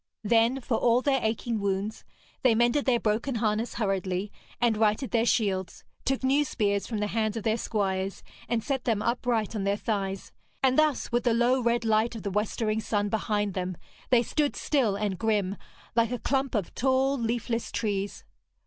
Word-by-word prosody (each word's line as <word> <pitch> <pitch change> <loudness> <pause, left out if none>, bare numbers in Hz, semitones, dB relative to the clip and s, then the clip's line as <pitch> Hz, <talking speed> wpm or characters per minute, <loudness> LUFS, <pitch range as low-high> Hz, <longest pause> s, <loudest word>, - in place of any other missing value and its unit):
Then, 230 +4 +3
for 235 -2 0
all 240 +2 +3
their 270 -3 +2
aching 220 +1 -1
wounds, 200 +2 -2 0.4
they 245 -4 +4
mended 240 +5 +2
their 250 -3 +3
broken 230 +5 0
harness 220 +1 0
hurriedly, 195 -2 -1 0.3
and 235 -2 +3
righted 215 +4 +1
their 230 0 +2
shields, 190 -7 0 0.2
took 270 0 0
new 275 +3 +3
spears 205 -7 -1
from 225 - -3
the 210 - 0
hands 215 +1 -1
of 220 - -4
their 220 0 +2
squires, 195 -4 -2 0.3
and 230 -2 0
set 270 -3 -2
them 220 -3 +1
upright 235 -3 0
on 205 - -1
their 200 +1 +1
thighs, 195 -3 -3 0.3
and 260 -1 +4
thus, 305 -2 +2
with 240 0 +1
the 235 -2 +2
low 245 +2 +3
red 235 0 +1
light 220 +2 +2
of 220 - -7
the 200 - -2
westering 215 +2 0
sun 205 -2 0
behind 210 -2 0
them, 185 -1 -3 0.3
they 245 -2 +5
stood 290 +4 0
still 250 -9 +1
and 200 -3 -2
grim, 210 -4 +1 0.4
like 230 -1 +3
a 245 - -2
clump 270 +1 -1
of 205 -5 -2
tall 265 +2 +2
leafless 235 -1 -2
trees. 205 -2 -2
225 Hz, 185 wpm, -27 LUFS, 205-240 Hz, 0.4 s, they